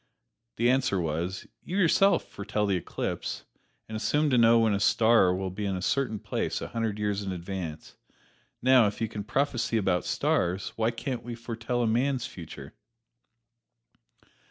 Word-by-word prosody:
The 120 - +2
answer 130 -7 +1
was, 85 +3 -3 0.2
"You 185 - -4
yourself 195 +2 +4
foretell 105 +1 -2
the 100 -2 +1
eclipse, 90 - -4 0.4
and 110 - -6
assume 145 +7 +1
to 125 - +4
know 115 0 +6
when 115 -2 +3
a 100 - 0
star 110 -2 +4
will 95 0 -3
be 100 +3 -5
in 100 -2 -1
a 90 - -4
certain 130 -3 0
place - - -2
a - - -6
hundred 115 -3 -2
years 105 -1 -1
in 100 -1 -4
advance; 90 -3 -6 0.7
now, 130 -3 +6
if 105 - -4
you 115 - 0
can 105 -1 -6
prophesy 120 -1 0
about 95 -4 +1
stars, 90 +3 0
why 115 0 +1
can't 120 +2 -4
we 120 0 -6
foretell 115 +1 -3
a - - +1
man's 125 +2 +1
future?" 85 -4 -9
110 Hz, 165 wpm, -28 LUFS, 95-120 Hz, 0.7 s, know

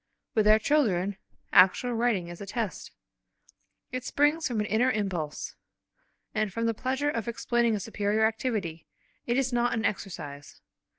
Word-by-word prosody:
With 215 -2 +3
our 215 0 +8
children, 205 -8 +1 0.4
actual 190 +7 +5
writing 225 -6 +1
is 175 +2 -9
a 200 - -7
test, 220 -1 -3 1.0
it 255 -1 -3
springs 295 +5 +2
from 240 -5 -2
an 210 - 0
inner 220 +5 +2
impulse, 190 -10 -2 0.8
and 215 -2 0
from 230 +4 -2
the 230 - +2
pleasure 265 +5 -1
of 230 -4 -3
explaining 235 0 +1
a - - -2
superior 210 +1 0
activity; 215 -8 -2 0.4
it 240 +1 +1
is 260 -2 0
not 240 0 +2
an 220 -2 -1
exercise. 150 -9 -5
220 Hz, 155 wpm, -28 LUFS, 195-245 Hz, 1.0 s, our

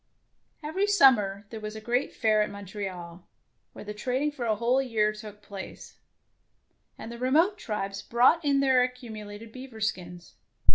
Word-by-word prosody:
Every 370 +7 0
summer 215 - +4
there 225 - -6
was 215 0 -6
a - - -5
great 240 +5 0
Fair 215 -2 +2
at 210 - 0
Montreal, 190 -3 -7 0.5
where - - -10
the 210 - -5
trading 260 +7 -1
for 260 -5 -5
a 220 -2 +2
whole 240 +5 +2
year 220 -5 +1
took 210 -1 -11
place, 200 -2 -9 1.0
and 225 - -8
the 235 - -8
re 255 +1 0
mote 355 +9 +3
tribes 195 -2 -3
brought 255 - +4
in 280 -1 +3
their 265 -2 +4
accumu 245 -4 -3
lated 215 +2 -10
beaver 255 -3 -9
skins. 180 -5 -4
220 Hz, 170 wpm, -28 LUFS, 205-260 Hz, 1.0 s, summer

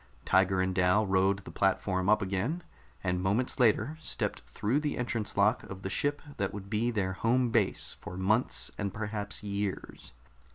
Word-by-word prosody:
Tiger 95 0 +3
and 95 0 0
Dal 90 +3 +3
rode 95 0 +2
the - - -8
platform 95 -1 +1
up 105 -1 +4
again 100 - -2 0.4
and 90 -1 0
moments 105 +9 0
later 125 +6 +3
stepped - - -2
through 120 +8 0
the 150 -1 -2
entrance 115 -4 -2
lock 105 +4 +4
of 100 0 -9
the 95 - -3
ship 145 +7 0
that 100 -1 -1
would 100 -1 -8
be 115 +2 +1
their 100 -5 -1
home 120 +4 +1
base 110 -4 +1
for 90 - -7
months 110 +7 +1
and 100 -2 -1
perhaps 105 -1 -4
years. 100 -1 -4
100 Hz, 170 wpm, -30 LUFS, 95-115 Hz, 0.4 s, up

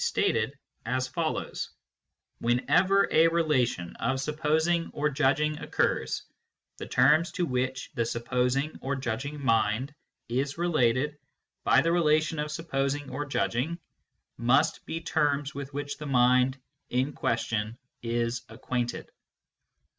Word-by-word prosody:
KNOWLEDGE - - +1 0.3
BY 115 - -4
ACQUAINTANCE 155 +5 -2 0.7
221 165 +8 +4
relation 130 - +1
of 130 +3 0
supposing 155 +3 +1
or 150 0 +1
judging 150 +2 +1
occurs, - - 0 0.5
the - - -7
terms 150 +7 +4
to 180 - 0
which 130 -1 -2
the 115 - 0
supposing 125 +5 0
or 140 +1 -1
judging 135 +3 -3
mind 115 +3 +1 0.3
is 135 +5 -1
related 150 -4 +1 0.4
by - - +5
the 165 - +1
relation 155 -2 +2
of 150 0 -2
supposing 145 -3 -2
or 145 +3 -3
judging 125 - -1 0.6
must 130 +7 +2
be 165 - -3
terms 145 -2 0
with 140 0 -6
which 145 +1 -5
the 150 - -5
mind 125 0 +3 0.3
in 130 +4 0
question 115 -3 -1 0.2
is 120 +1 -1
acquainted. 120 +1 -3
135 Hz, 115 wpm, -28 LUFS, 125-150 Hz, 0.7 s, by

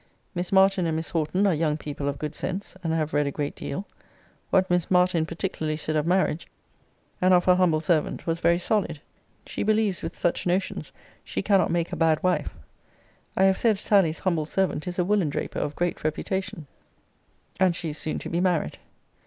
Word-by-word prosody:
'Miss 175 -1 -3
Martin 190 -2 +4
and 160 - 0
Miss 160 0 -3
Horton 170 +5 +1
are 195 - +4
young 155 -1 0
people 145 -2 -5
of 140 - -4
good 150 +2 -4
sense, 190 +1 -5
and 165 - -1
have 160 -1 -1
read 145 -1 +2
a - - -1
great 145 0 -3
deal. 190 +8 -5 0.6
What 185 0 +3
Miss 180 -2 +1
Martin 180 -3 +3
particularly 160 -3 -3
said 155 0 -3
of 155 +1 +1
marriage, 180 -2 +1 0.7
and 185 0 +5
of 175 - +3
her 180 - +6
humble 180 -4 +3
servant, 165 -3 0
was 165 0 -1
very 170 0 +3
solid. 185 -4 -1 0.5
She - - -5
believes 215 -3 +1
with 165 - -6
such 175 +1 0
notions 185 +2 -1 0.3
she - - -3
cannot 195 -3 +3
make 170 +1 0
a - - 0
bad 160 -1 +2
wife.' 185 -1 0 0.8
I 190 - +4
have 190 0 +4
said 220 -4 +3
Sally's 195 -6 +3
humble 170 -5 0
servant 190 -2 -1
is 180 - -4
a 180 - +2
woolen 195 -5 +2
draper - - -3
of 145 - -3
great 175 0 -2
reputation; 190 +3 -3 0.9
and 185 -2 +3
she 165 -2 -3
is 150 - -7
soon 155 - -2
to - - -6
be 170 - 0
married. 180 -4 0
175 Hz, 195 wpm, -26 LUFS, 155-190 Hz, 0.9 s, her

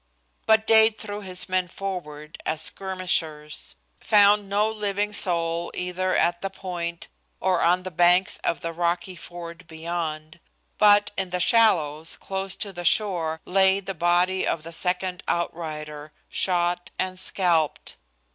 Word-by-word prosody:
But 220 0 +4
Dade 220 0 +5
threw 205 -1 -6
his 185 -1 +2
men 185 -1 0
forward 170 -6 -7
as 155 - -1
skirmishers; 170 -6 -2 0.2
found 205 -1 +4
no 205 +2 +2
living 210 -1 -2
soul 170 -2 0
either 180 +1 -2
at 175 0 +1
the 195 - -2
point 175 -3 -5 0.3
or 185 -2 +1
on 180 +2 +3
the 185 - -6
banks 175 +4 +3
of - - -1
the 165 0 -4
rocky 175 +2 -1
ford 170 0 -10
beyond; 160 -1 -5 0.4
but, 205 0 +5
in 190 -1 -2
the 180 0 -2
shallows, 165 -7 +3
close 190 0 -2
to 200 -2 -5
the 175 -1 -6
shore, 170 -4 +1
lay 190 +1 +3
the 195 0 -6
body 175 +2 +1
of 155 - -1
the 165 +1 -8
second 180 +1 0
outrider, 155 -3 -4 0.2
shot 175 -1 0
and 185 0 -3
scalped. 170 -5 0
180 Hz, 140 wpm, -24 LUFS, 170-195 Hz, 0.4 s, Dade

